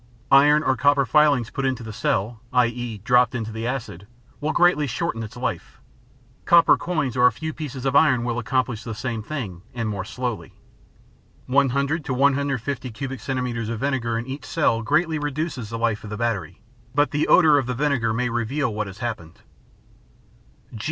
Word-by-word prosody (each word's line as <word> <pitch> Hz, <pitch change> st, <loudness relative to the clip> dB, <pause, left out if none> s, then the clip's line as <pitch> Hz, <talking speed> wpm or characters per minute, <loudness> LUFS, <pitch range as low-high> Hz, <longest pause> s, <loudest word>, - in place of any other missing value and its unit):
Iron 145 Hz, +2 st, +6 dB
or 130 Hz, -, +2 dB
copper 140 Hz, +1 st, +3 dB
filings 140 Hz, -3 st, +3 dB
put 135 Hz, -, -3 dB
into 130 Hz, -2 st, -1 dB
the 110 Hz, -1 st, -7 dB
cells 110 Hz, 0 st, -1 dB, 0.2 s
i.e., 120 Hz, -2 st, 0 dB
dropped 125 Hz, 0 st, +3 dB
into 115 Hz, -2 st, -3 dB
the 110 Hz, +2 st, -4 dB
acid, 115 Hz, -7 st, -5 dB, 0.3 s
will 150 Hz, +1 st, -1 dB
greatly 170 Hz, -4 st, +3 dB
shorten 135 Hz, -1 st, -2 dB
its 110 Hz, -, -8 dB
life. -, -, -4 dB, 0.7 s
Copper 170 Hz, -1 st, +6 dB
coins 155 Hz, -8 st, -2 dB
or 125 Hz, 0 st, +6 dB
a -, -, +3 dB
few 160 Hz, +7 st, -5 dB
pieces 135 Hz, -4 st, -6 dB
of 135 Hz, 0 st, 0 dB
iron 140 Hz, -5 st, +4 dB
will 120 Hz, 0 st, -2 dB
accomplish 125 Hz, -2 st, -1 dB
the 115 Hz, -2 st, -6 dB
same 115 Hz, -2 st, -4 dB, 0.5 s
and 115 Hz, -2 st, -2 dB
more 100 Hz, -3 st, -3 dB
slowly. 115 Hz, -5 st, -5 dB, 0.9 s
One 135 Hz, +1 st, +3 dB
hundred 140 Hz, +5 st, -1 dB
to 130 Hz, -, -2 dB
150 135 Hz, -1 st, 0 dB
cubic 135 Hz, +3 st, -6 dB
centimeters 125 Hz, -3 st, -3 dB
of 115 Hz, -1 st, -4 dB
vinegar 130 Hz, -5 st, -1 dB
in 115 Hz, -, -4 dB
each 135 Hz, +2 st, -6 dB
cell 145 Hz, -7 st, +1 dB
greatly 155 Hz, +5 st, +1 dB
reduces 145 Hz, -5 st, -3 dB
the 115 Hz, -, -4 dB
life 115 Hz, -2 st, -1 dB
of 105 Hz, -, -8 dB
the 105 Hz, -, -5 dB
battery, 110 Hz, -6 st, -3 dB, 0.3 s
but 145 Hz, 0 st, +3 dB
the 150 Hz, +1 st, 0 dB
odor 155 Hz, -5 st, +6 dB
of 130 Hz, -, -3 dB
the 125 Hz, -, -2 dB
vinegar 130 Hz, -4 st, +1 dB
may 125 Hz, +3 st, 0 dB
reveal 120 Hz, +2 st, -1 dB
what 105 Hz, 0 st, -3 dB
has 95 Hz, +1 st, -10 dB
happened. 110 Hz, -9 st, -6 dB
125 Hz, 180 wpm, -23 LUFS, 115-140 Hz, 0.9 s, Iron